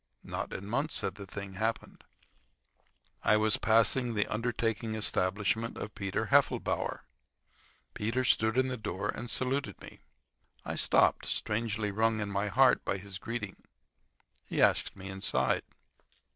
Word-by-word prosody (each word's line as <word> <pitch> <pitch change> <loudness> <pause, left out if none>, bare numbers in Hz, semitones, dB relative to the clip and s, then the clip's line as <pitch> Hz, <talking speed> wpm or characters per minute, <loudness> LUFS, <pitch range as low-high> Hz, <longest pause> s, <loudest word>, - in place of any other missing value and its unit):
Not - - -4
in 100 - -6
months 135 +9 -1
had - - -2
the 100 -1 -9
thing 100 0 -7
happened. 110 +4 -3 1.2
I 105 - +4
was 110 0 +3
passing 115 +2 +3
the 105 - +2
undertaking 115 -1 -1
establishment 105 +2 0
of 105 - -6
Peter 100 -2 -2
Heffelbower. - - +2 0.9
Peter 115 +5 -1
stood 110 -1 +2
in 130 0 +3
the 130 -1 -3
door 105 -1 -3
and 120 +1 -4
saluted 135 +3 -1
me. - - -12 0.7
I - - -3
stopped, - - +3
strangely 105 -1 -1
wrung 110 +2 +1
in 105 -1 -3
my 100 +1 0
heart 130 +5 +4
by 95 - -1
his 95 0 -8
greeting. 110 -4 -5 0.9
He - - -4
asked - - +3
me 95 -1 -9
inside. 95 0 +1
110 Hz, 140 wpm, -31 LUFS, 100-115 Hz, 1.2 s, I